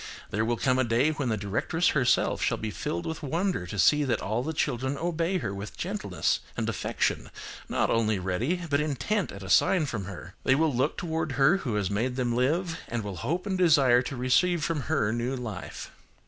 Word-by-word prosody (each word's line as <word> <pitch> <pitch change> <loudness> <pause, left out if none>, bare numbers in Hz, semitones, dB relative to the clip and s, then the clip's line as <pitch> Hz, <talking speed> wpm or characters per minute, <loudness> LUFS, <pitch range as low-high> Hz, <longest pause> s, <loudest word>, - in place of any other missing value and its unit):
There 110 +2 0
will 120 +1 0
come 130 +2 +2
a - - +4
day 120 +6 +2
when 145 -5 -2
the 110 - 0
directress 115 - 0
herself 125 -4 +2
shall - - +1
be 110 -1 -4
filled 85 -3 -3
with 160 - -4
wonder 165 - -1
to 100 - -6
see 150 - +5
that 120 -5 0
all 110 +4 -1
the 155 - -3
children 135 -3 -1
obey 170 +3 0
her 105 - -3
with 100 +1 -7
gentleness - - -1 0.2
and - - -1
affection, - - -1 0.4
not - - +1
only 110 -2 +2
ready, 110 - -1
but 140 -1 +1
intent, 155 - -1
at 100 0 -9
a 95 - -7
sign 175 - +4
from 115 -8 -4
her. 90 -1 -9
They 130 - +4
will 155 0 +2
look 130 +5 0
toward 160 -4 -2
her 140 +8 +4
who 125 - -3
has 100 -2 0
made 120 +5 -1
them 120 -2 0
live, 165 +7 0
and 120 -2 -3
will 100 -3 -5
hope 165 - -2
and 190 -2 -1
desire 140 -8 +5
to 130 +2 -5
receive 140 +7 +2
from 160 -3 -1
her, 125 -10 +2
new 120 +3 -1
life. 110 -7 -6
130 Hz, 210 wpm, -27 LUFS, 110-160 Hz, 0.4 s, see